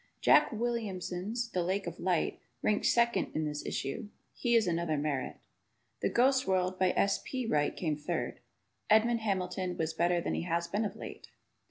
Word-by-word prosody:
Jack - - +5
Williamson's 225 -1 -2
"The 180 - 0
Lake 190 +3 -1
of 170 0 -6
Light" 180 -3 0 0.2
ranked 210 -1 +2
second 235 0 +3
in 155 - 0
this 150 -1 -3
issue. 135 +9 -3 0.2
He 235 -1 +1
is 225 -2 +5
another 170 -2 0
Merritt. 145 -3 -2 0.6
"The - - +1
Ghost 260 0 +3
World," 185 -1 +1
by 185 -1 +4
S. 200 - +2
P. 255 -2 -3
Wright, 150 -9 +1
came 155 -4 0
third. 150 0 -3 0.5
Edmond 230 +2 +4
Hamilton 185 -3 -2
was 160 0 -1
better 175 +2 +2
than - - -2
he - - -1
has 170 0 -1
been 205 +5 -1
of 205 - -4
late. - - -9
185 Hz, 175 wpm, -31 LUFS, 170-220 Hz, 0.6 s, Jack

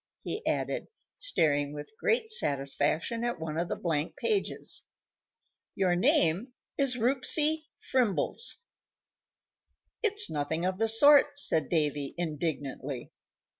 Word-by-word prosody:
he 435 - -4
added, - - -1 0.3
staring 145 - 0
with 145 +8 -9
great 455 -1 +2
satisfaction 150 - 0
at 240 -5 -2
one 160 -1 -5
of 170 - -1
the - - -1
blank 160 -3 -2
pages. 420 -4 -1 0.9
"Your 185 -2 +2
name 180 +6 +2 0.2
is 275 -3 +1
Rupsy 295 +6 +3
Frimbles." 255 - 0 1.4
"It's 425 -2 +1
nothing 160 +3 -2
of 185 +1 -2
the 225 - +2
sort," 285 +5 +6
said 160 - +2
Davy, 150 -4 -1
indignantly. 145 -5 -4
180 Hz, 110 wpm, -29 LUFS, -, 1.4 s, sort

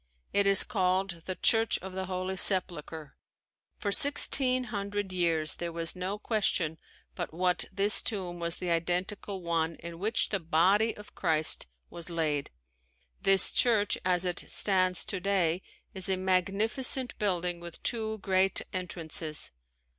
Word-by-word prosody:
It 200 0 +2
is 195 -1 +6
called 185 -3 -1
the 185 - -3
"Church 225 +2 +2
of 190 0 -9
the 190 0 -5
Holy 185 0 -4
Sepulchre." 165 -6 +1 0.6
For 200 - -3
sixteen 255 0 +5
hundred 200 -1 -4
years 165 -4 +1
there 170 -1 -5
was 165 +1 -2
no 185 +3 -4
question 190 -7 -1 0.3
but - - -5
what 180 +2 +1
this 200 +2 +4
tomb 185 -5 -4
was 170 0 +1
the 180 -2 -4
identical 180 +3 -3
one 165 -1 -1
in 170 0 -10
which 215 +4 0
the 195 - -1
body 185 +7 +1
of 210 0 -13
Christ 160 - 0 0.2
was 170 +1 -8
laid. 155 -4 -2 0.7
This 195 -1 +7
church 220 -4 +2
as 180 -1 +1
it 180 -1 -2
stands 185 -3 +1
today 185 -3 -1 0.3
is 190 0 -1
a 190 - +1
magnificent 205 +8 0
building 180 -4 -1
with 170 -1 -11
two 220 -2 -2
great 190 0 +2
entrances. 165 -4 -3
185 Hz, 140 wpm, -28 LUFS, 170-200 Hz, 0.7 s, This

